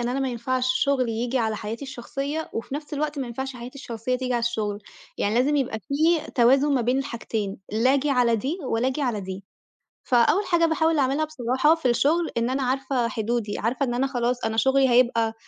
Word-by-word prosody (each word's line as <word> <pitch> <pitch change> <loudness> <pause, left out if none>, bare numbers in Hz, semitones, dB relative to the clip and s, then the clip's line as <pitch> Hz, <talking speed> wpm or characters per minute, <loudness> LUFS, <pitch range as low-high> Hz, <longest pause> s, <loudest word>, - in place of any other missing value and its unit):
إن 240 - -1
أنا 260 +2 -1
ما 270 - 0
ينفعش 255 +1 -1 0.2
شغلي 260 -4 +1
ييجي 240 +3 -1
على 220 -2 0
حياتي 220 +5 -5
الشخصية، 275 +4 -5
وفي 230 +4 -5
نفس 295 0 -5
الوقت 295 0 -2
ما 265 - -2
ينفعش 265 +2 -5
حياتي 245 +2 -9
الشخصية 245 -1 -3
تيجي 255 0 -3
على 240 - +1
الشغل. 220 -3 -1 0.4
يعني 205 - 0
لازم 270 +5 +2
يبقى 255 -5 -1
في 315 +4 +1
توازن 270 +4 +4
ما 260 - +2
بين 250 +3 +1
الحاجتين، 230 -7 -3 0.2
لا 250 +5 +3
آجي 285 +1 +1
على 245 -3 +3
دي، 275 - -3
ولا 250 0 0
آجي 275 +3 -2
على 235 -5 -1
دي. 190 0 -7 0.6
فأول 250 - +3
حاجة 335 -1 +3
باحاول 320 0 +1
أعملها 275 +3 +2
بصراحة، 265 0 +2
في 325 -6 -1
الشغل، 315 +8 +2
إن 235 +1 +1
أنا 270 +1 -1
عارفة 260 -1 0
حدودي، 225 -2 -2
عارفة 255 +5 0
إن 240 - -2
أنا 255 +3 +1
خلاص، 245 -1 -1
أنا 220 - -1
شغلي 265 +3 +3
هيبقى 235 -2 +3
255 Hz, 205 wpm, -24 LUFS, 235-280 Hz, 0.6 s, توازن